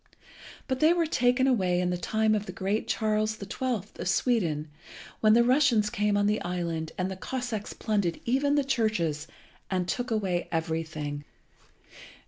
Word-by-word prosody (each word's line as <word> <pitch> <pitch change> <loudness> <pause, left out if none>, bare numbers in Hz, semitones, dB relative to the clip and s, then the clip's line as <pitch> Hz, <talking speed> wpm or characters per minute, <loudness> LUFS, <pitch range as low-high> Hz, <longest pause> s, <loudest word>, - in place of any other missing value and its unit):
But 260 -2 -1
they 315 +2 +5
were 345 -1 +1
taken 250 -3 +2
away 185 -9 +2
in 180 0 0
the - - 0
time 220 +5 +1
of 210 -1 -1
the - - -4
great 195 +4 -2
Charles 215 0 0
the 205 - -8
Twelfth 220 -1 -3
of - - -2
Sweden, 170 - +1 0.5
when 215 -1 +5
the 235 +1 +6
Russians 245 -5 +3
came 210 0 +1
on 205 - +2
the 210 +1 +1
island 170 -3 -3
and 185 +1 -1
the - - -4
Cossacks 235 +1 -4
plundered 200 -6 -1
even 275 +4 +2
the 290 - +3
churches, 215 - 0 0.4
and 185 -2 -1
took 245 +7 -2
away 195 -6 -1
everything. 160 -3 -3
210 Hz, 165 wpm, -28 LUFS, 180-245 Hz, 0.5 s, the